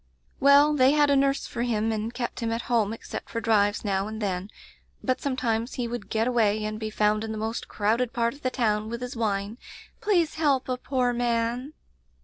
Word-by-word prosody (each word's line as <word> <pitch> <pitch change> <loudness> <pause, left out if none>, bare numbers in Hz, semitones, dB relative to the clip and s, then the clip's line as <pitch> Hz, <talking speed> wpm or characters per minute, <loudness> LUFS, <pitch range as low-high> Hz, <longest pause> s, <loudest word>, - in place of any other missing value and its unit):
"Well, 285 +2 +6
they 265 -1 +5
had 295 -1 +4
a - - +5
nurse 275 0 +2
for 235 - -5
him 225 -2 0
and 220 +1 -2
kept 240 -1 -4
him 230 -2 -1
at 230 +1 -2
home 225 -4 +1
except 225 - -7
for 230 - -3
drives 210 -2 +2
now 195 0 0
and 220 0 -6
then, 190 -2 -2 0.5
but 255 -1 0
sometimes 240 -3 -1
he 245 -3 -2
would 240 +1 -6
get 225 +1 +1
away 215 -3 +2
and 215 0 -4
be 220 -1 -3
found 215 0 +1
in 220 - -4
the 220 - -4
most 220 +2 -3
crowded 225 +4 0
part 235 -1 0
of 285 - -16
the 255 - 0
town, 215 -4 0
with 235 +1 -5
his 250 0 -5
whine 210 0 -2 0.2
— - - -22
'Please 350 -7 +2
help 275 -4 +2
a 255 -1 -1
poor 250 -1 0
man! 240 +3 -1
235 Hz, 215 wpm, -26 LUFS, 215-255 Hz, 0.5 s, Well